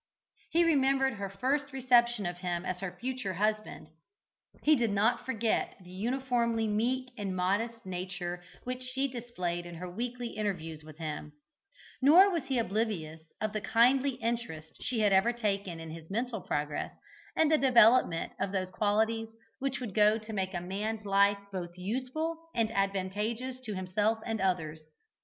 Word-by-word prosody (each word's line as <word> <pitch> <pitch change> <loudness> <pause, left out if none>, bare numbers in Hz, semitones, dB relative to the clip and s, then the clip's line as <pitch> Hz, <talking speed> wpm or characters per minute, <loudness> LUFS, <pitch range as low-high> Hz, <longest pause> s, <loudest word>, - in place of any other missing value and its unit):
He 340 +1 +4
remembered 270 -4 +3
her 200 -2 -4
first 275 +8 -1
reception 240 -4 +3
of 175 0 -3
him 175 -1 -2
as 185 -1 -2
her 195 -2 -5
future 250 -6 -3
husband; 215 -5 -1 0.7
he 310 - +6
did 240 -4 +1
not 205 +6 +1
forget 230 -3 0
the 180 -1 -14
uniformly 235 +1 0
meek 250 +5 0
and 195 -2 -2
modest 225 +6 0
nature 180 -1 -4 0.2
which 255 0 -4
she 260 +2 -1
displayed 185 -9 -4
in 175 - -8
her 180 +2 -6
weekly 240 +5 -4
interviews 165 -8 -3
with 155 -1 -12
him; 150 -2 -5 0.7
nor 350 +9 +8
was 335 -6 -1
he 265 -1 0
oblivious 195 -8 -1 0.2
of 215 -1 -2
the 215 - -2
kindly 255 +5 +4
interest 230 -10 -3
she 250 -3 -1
had 205 -2 +4
ever 195 +5 +5
taken 200 -7 -2
in 165 -1 -7
his 160 0 -10
mental 230 +1 -2
progress 150 -3 -2 0.4
and 320 -1 +3
development 235 -8 +5
of 195 0 -1
those 185 -2 -2
qualities 220 +3 +1 0.3
which 270 -1 -1
go 210 +1 +5
to 220 0 -8
make 190 -2 -2
a 175 - -2
man's 210 +4 -3
life 200 0 +4
both 175 -2 -5
useful 260 - -2 0.2
and 225 -1 +1
advantageous 210 +6 -1
to 220 -5 -5
himself 205 +4 +1
and 225 -3 -2
others. 160 -5 0
215 Hz, 155 wpm, -31 LUFS, 185-245 Hz, 0.7 s, nor